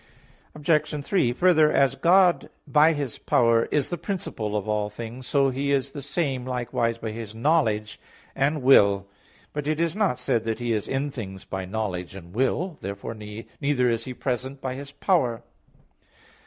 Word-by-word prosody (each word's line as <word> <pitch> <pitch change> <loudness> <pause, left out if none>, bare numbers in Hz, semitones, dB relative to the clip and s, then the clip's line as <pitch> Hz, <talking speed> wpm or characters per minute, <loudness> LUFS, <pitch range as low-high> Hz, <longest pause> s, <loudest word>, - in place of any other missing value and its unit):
Obj. 150 -1 0
3: 180 -12 +2
Further, 155 +1 +4
as 135 -1 +3
God 175 +6 +4 0.2
by 155 +2 +5
His 145 -5 -4
power 115 -1 +3
is 145 -3 0
the 175 - -3
principle 170 - -3
of 105 - -4
all 105 -1 0
things, 115 +4 -8
so 140 -2 +3
He 140 +2 -1
is 135 -1 +1
the 145 - -7
same 140 -3 -2
likewise 120 -2 -1
by 110 -1 -5
His 110 -1 -7
knowledge 110 -6 +1 0.4
and 140 +1 0
will. 100 -7 +5 0.5
But 150 -1 -3
it 155 0 0
is 165 +1 0
not 205 - +1
said 125 -3 0
that 115 -1 -1
He 120 -1 -1
is 105 -2 -2
in 135 +2 -1
things 95 -7 -7
by 95 -1 -4
knowledge 95 -3 -4
and 90 -2 -11
will. 145 - 0
Therefore 100 +3 -5
neither 120 +5 -2
is 115 - -2
He 130 -1 -6
present 130 +2 -3
by 130 -1 -3
His 140 +2 -8
power. 130 - +1
130 Hz, 170 wpm, -25 LUFS, 110-150 Hz, 0.5 s, by